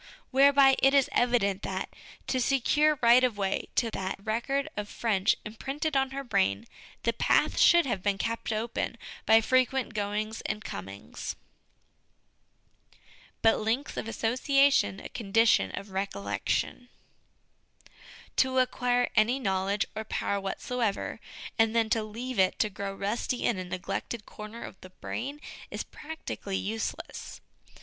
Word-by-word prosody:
Whereby 275 0 +6
it 270 +1 +5
is 275 -2 +4
evident 210 -6 +2
that, 190 0 -3 0.4
to 260 - 0
secure 295 +4 +3
right 240 +2 +7
of 245 -5 +1
way 195 -1 -1
to 230 -2 +1
that 190 -2 -3
record 240 +6 -1
of 210 0 -4
French 205 -5 +1
imprinted 275 +8 -3
on 270 0 +2
her 275 +1 -5
brain, 100 - +1 0.4
the - - +1
path - - +2
should 345 -2 +6
have 205 -8 -2
been 200 0 0
kept 230 +2 -2
open 225 +1 -2 0.3
by 225 +1 +7
frequent 255 +2 +1
goings 210 +1 -2
and 215 0 -4
comings. 95 +1 -6 2.1
But 225 - +5
Links 230 +7 -1
of - - -4
Association 255 -1 +2
a - - -7
Condition 225 - +3
of 200 0 -8
Recollection. 190 - -2 1.5
To 260 0 +3
acquire 245 -1 +2
any 230 +4 +4
knowledge 195 -3 0
or 220 - -3
power 200 -2 -2
whatsoever, 215 +2 -2 0.4
and 225 0 +3
then 225 -1 +2
to 225 - +3
leave 230 +2 -5
it 185 -1 +3
to 215 - +1
grow 195 0 -5
rusty 215 +5 -2
in 215 -6 +1
a - - -3
neglected 185 +4 -4
corner 215 +2 -9
of - - -10
the 185 - -11
brain, 275 +9 -5 0.3
is - - -4
practically 300 -10 -6
useless. 220 +3 -5
225 Hz, 140 wpm, -29 LUFS, 200-255 Hz, 2.1 s, right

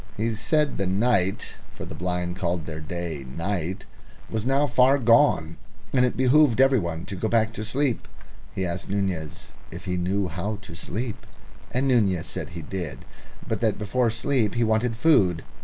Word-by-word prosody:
He 115 +2 0
said 150 +6 +1
the 100 - 0
night 100 -1 +1 0.2
for - - -9
the - - -8
blind 90 0 -2
call 90 -1 -1
their 80 -1 -6
day 80 -2 -5
night 85 +6 -3 0.5
was 110 +1 -1
now 135 +2 +3
far 130 +1 +4
gone, 115 - +3 0.4
and 125 -2 +4
it 125 - +1
behoved 130 -1 +4
every 135 -1 +5
one 85 -2 -4
to 100 - -5
go 105 +4 -1
back 110 0 +2
to 110 - -5
sleep. 130 +2 -1 0.5
He 95 - -1
asked 85 +2 -4
Nunez 95 -6 -2 0.2
if - - -9
he 90 -1 -1
knew 95 +2 0
how 105 +7 -3
to 100 - -10
sleep, 110 +7 -5 0.5
and 130 +2 0
Nunez 100 -10 +2
said - - -5
he 85 0 -7
did, 80 -5 -5 0.4
but - - -1
that - - +1
before 115 +4 +1
sleep 115 -1 0
he 120 - +2
wanted 110 +1 +1
food. 100 - +3
100 Hz, 175 wpm, -25 LUFS, 90-125 Hz, 0.5 s, every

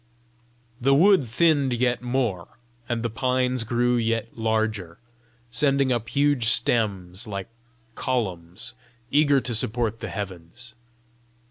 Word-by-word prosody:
The 135 +2 +4
wood 180 -3 +5
thinned 140 +1 +2
yet 120 0 +1
more, 120 -7 -2 0.3
and 120 -1 -1
the 120 - 0
pines 125 0 0
grew 120 +2 +1
yet 115 -1 -1
larger, 110 -6 -1 0.5
sending 135 +1 +2
up 120 -1 -3
huge 145 -4 +2
stems, 110 -4 +1
like 100 +1 -5 0.4
columns 95 -10 -3 0.4
eager 145 -1 +4
to 125 - -3
support 115 0 -1
the - - -5
heavens. 100 +4 -7
120 Hz, 115 wpm, -25 LUFS, 110-130 Hz, 0.5 s, wood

